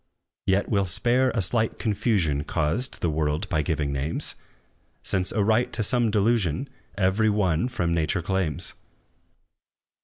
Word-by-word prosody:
Yet 95 +1 +2
we 100 - +1
'll 100 - +1
spare 125 +8 +2
a 100 - 0
slight 110 +4 +1
confusion 95 - 0
Caused 80 - -1
the 85 - +1
world 75 +4 -1
by 80 -5 +1
giving 75 -2 -1
names; 70 +4 -3 0.7
Since 95 -1 -1
a 105 - +1
right 110 +4 +2
to 110 - 0
some 120 +2 +2
delusion 105 - +1 0.3
Every 100 +3 +2
one 95 -3 +1
from 90 -10 -1
nature 80 +1 0
claims! 90 -5 -2
95 Hz, 145 wpm, -25 LUFS, 80-110 Hz, 0.7 s, Yet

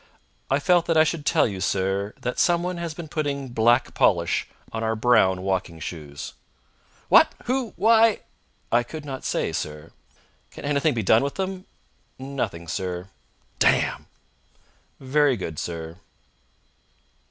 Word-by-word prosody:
"I 135 - +3
felt 175 +3 +2
that 165 - +2
I 155 - +7
should 155 -2 -2
tell - - +4
you, 95 -4 -5
sir, 95 +2 -1
that 125 - -3
somebody 175 0 +1
has 170 -2 -4
been 170 -1 -7
putting 140 -3 -3
black 120 +1 +2
polish 85 -4 +2 0.2
on 115 0 -3
our 110 0 0
brown 110 -5 +3
walking 95 -3 -2
shoes." 75 -3 -7 0.7
"What! - - +6
Who? 255 -2 -1
Why?" 225 0 +4 0.5
"I 120 - +4
could 150 +5 -8
not 135 -2 -6
say, - - -1
sir." 75 +1 -5 0.6
"Can - - -10
anything 145 0 +1
be 115 - -1
done 110 +4 +5
with 140 - -3
them?" 190 -1 -4 0.5
"Nothing, 125 -11 -4
sir." 90 +1 -4 0.5
"Damn!" - - +2 0.9
"Very 135 0 +2
good, 80 -6 -5
sir." 85 0 -6
120 Hz, 140 wpm, -24 LUFS, 95-155 Hz, 0.9 s, I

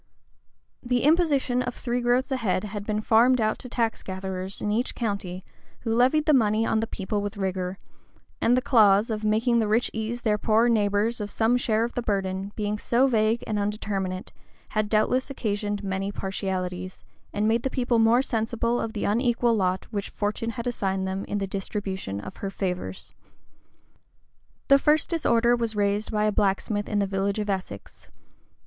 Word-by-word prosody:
The 245 0 0
imposition 290 -5 +3
of 250 -1 -3
three 245 0 -2
groats 245 +3 +1
a 265 - +1
head 215 -5 0
had 205 -1 -6
been 215 0 0
farmed 240 +4 +4
out 215 -1 0
to 250 - -7
tax 230 -2 -1
gatherers 190 0 -4
in 210 - -1
each 235 +4 -1
county, 200 -5 -3 0.4
who 225 -2 -1
levied 260 +6 +3
the 310 - +4
money 220 -3 +3
on 220 - +1
the 225 - -1
people 205 0 -3
with 205 0 -5
rigor; 190 -1 -2 0.6
and 245 +2 +4
the 255 - 0
clause, 215 -3 +4
of 215 0 -3
making 225 +3 +2
the 220 - +1
rich 220 +3 +2
ease 220 +2 -3
their 210 -3 +1
poorer 225 +3 +3
neighbors 210 +1 +1
of 205 - -4
some 225 +3 +2
share 225 -3 +1
of 235 - -3
the 245 - -2
burden, 195 -2 -2
being 210 -1 -2
so 245 +5 +2
vague 225 -2 +2
and 210 -1 -1
undeterminate, 200 -2 -3 0.4
had 215 -1 -1
doubtless 245 +5 +1
occasioned 205 -5 -2
many 195 0 -2
partialities, 185 -2 -4 0.3
and 210 +1 0
made 225 +1 +2
the 265 - -1
people 245 -3 +1
more 230 +3 +4
sensible 235 0 -1
of 225 - -4
the 210 - -3
unequal 235 +2 +2
lot 185 -2 0
which 200 -3 -3
Fortune 215 +3 -2
had 235 - -4
assigned 195 -5 -1
them 190 +1 -3
in 205 - -3
the 200 - -1
distribution 195 - -4
of 180 - -9
her 195 - -4
favors. 180 - -4 1.5
The 275 0 +6
first 300 +4 +2
disorder 240 -7 +3
was 230 -2 -2
raised 205 +1 0
by 210 -1 +1
a 215 - +2
blacksmith 205 +1 0
in 205 -2 +1
a - - +1
village 195 +1 -1
of 210 -1 -1
Essex. 190 -1 -6
215 Hz, 180 wpm, -26 LUFS, 200-235 Hz, 1.5 s, The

